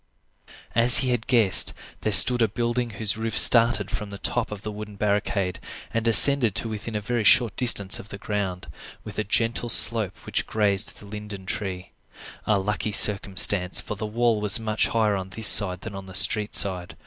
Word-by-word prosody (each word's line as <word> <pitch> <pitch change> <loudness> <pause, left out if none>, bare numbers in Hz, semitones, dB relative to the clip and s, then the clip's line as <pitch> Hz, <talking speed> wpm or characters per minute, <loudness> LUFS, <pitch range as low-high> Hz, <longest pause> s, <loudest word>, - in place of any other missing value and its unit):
As 120 +1 +2
he 130 - -1
had 120 -2 -4
guessed, 115 -7 +2 0.3
there 110 - -3
stood 120 +6 +6
a 115 - +2
building 120 +3 -3
whose 110 -1 0
roof 110 -1 -3
started 115 -4 +4
from 105 0 -6
the 100 - -10
top 120 +3 -3
of 105 -1 -9
the 110 - -6
wooden 105 0 -10
barricade 100 -3 -3 0.3
and 115 - -2
descended 115 0 +3
to - - -1
within 110 +1 -7
a - - -2
very 120 +1 -3
short 115 +1 +3
distance 105 -6 +1
of 105 - -13
the 100 - -9
ground, 100 -3 -5 0.4
with - - -9
a - - -1
gentle 115 +3 -2
slope 110 -4 +2
which - - -3
grazed 100 -3 -1
the - - -15
linden 105 -2 -9
tree. 95 -3 -7 0.6
A 105 - +1
lucky 105 +2 -4
circumstance, 100 -2 +3
for - - -5
the 105 +2 -6
wall 115 0 -1
was 105 +1 +3
much 110 -1 -2
higher 110 -3 -1
on 95 -1 -7
this 110 +3 -2
side 95 -3 +4
than 110 - -9
on 95 -1 -10
the 95 - -12
street 105 +1 +3
side. 90 -3 -1
105 Hz, 195 wpm, -23 LUFS, 100-115 Hz, 0.6 s, stood